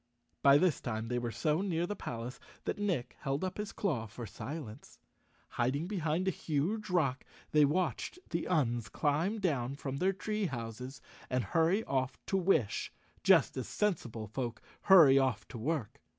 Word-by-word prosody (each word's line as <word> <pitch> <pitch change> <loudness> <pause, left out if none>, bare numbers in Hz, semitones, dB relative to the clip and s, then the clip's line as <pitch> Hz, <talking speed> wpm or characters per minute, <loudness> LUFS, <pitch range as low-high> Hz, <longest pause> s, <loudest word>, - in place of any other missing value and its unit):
By 140 0 +7
this 175 -2 +2
time 110 -2 -3
they 125 0 0
were 120 -1 -2
so 155 +6 +1
near 175 -4 0
the 205 - -3
palace 120 - -6 0.2
that - - -3
Nick 175 -12 -1
held 140 +2 -2
up 185 +2 -3
his 210 -1 -3
claw 140 - -1
for 115 +3 -8
silence. 115 +3 -8 0.5
Hiding 130 +6 0
behind 180 -2 -1
a - - +4
huge 175 +8 -2
rock, 145 -7 +1 0.3
they 150 -1 +6
watched 175 - -1
the 170 0 -1
Uns 120 -10 +1
climb 160 +9 0
down 140 -9 0
from 140 -1 -4
their 185 +6 +2
tree 210 +2 -2
houses 125 +1 -6 0.3
and 125 -1 +1
hurry 165 - +2
off 130 - -1
to 195 - +1
wish, 160 - +1 0.3
just - - +5
as - - -3
sensible 125 - -1
folk 115 +2 -4 0.3
hurry 160 -9 +8
off 130 -6 0
to 115 - -7
work. 140 -1 -2
145 Hz, 165 wpm, -33 LUFS, 120-180 Hz, 0.5 s, hurry